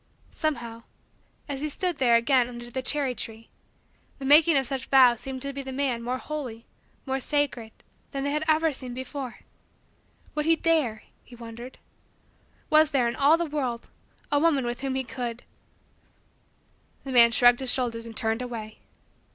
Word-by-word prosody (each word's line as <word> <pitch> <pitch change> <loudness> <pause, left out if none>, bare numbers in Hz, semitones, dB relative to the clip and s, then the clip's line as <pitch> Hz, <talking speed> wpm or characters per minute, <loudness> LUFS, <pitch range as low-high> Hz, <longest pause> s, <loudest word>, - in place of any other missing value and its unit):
Somehow, 235 -7 -3 0.7
as 280 -1 -4
he 305 - -2
stood 355 +2 -2
there 240 -3 +4
again 245 +1 +3
under 240 0 -9
the 260 - -3
cherry 275 0 0
tree, 225 -1 -6 0.7
the 270 - -7
making 300 +2 +6
of 270 - +1
such 265 -1 -4
vows 250 -4 +6
seemed 265 0 -5
to 280 0 -4
the 270 -1 -6
man 260 -3 -1
more 250 +2 -2
holy, 255 -6 -6 0.4
more 265 -1 -1
sacred, 265 -5 -1 0.4
than 275 -1 -4
they 285 - -1
had 300 +1 -1
ever 315 0 +3
seemed 255 -2 -7
before. 260 0 -6 0.9
Would 300 0 -2
he 330 - +5
dare 305 -10 0 0.2
He 245 - -14
wondered. 235 +2 -10 0.9
Was 310 0 +6
there, 265 -5 +2
in 235 - -2
all 290 +4 +4
the 340 - -1
world, 265 -6 -3 0.4
a 290 - +3
woman 290 -5 +2
with 240 +1 -4
whom 270 -1 -2
he 265 - -1
could 240 -1 -5 1.6
The 270 - -6
man 235 -2 +7
shrugged 245 +1 +5
his 260 -2 +2
shoulders 230 -3 -1
and 225 - -10
turned 225 +1 0
away. 225 -3 -7
260 Hz, 170 wpm, -26 LUFS, 240-285 Hz, 1.6 s, man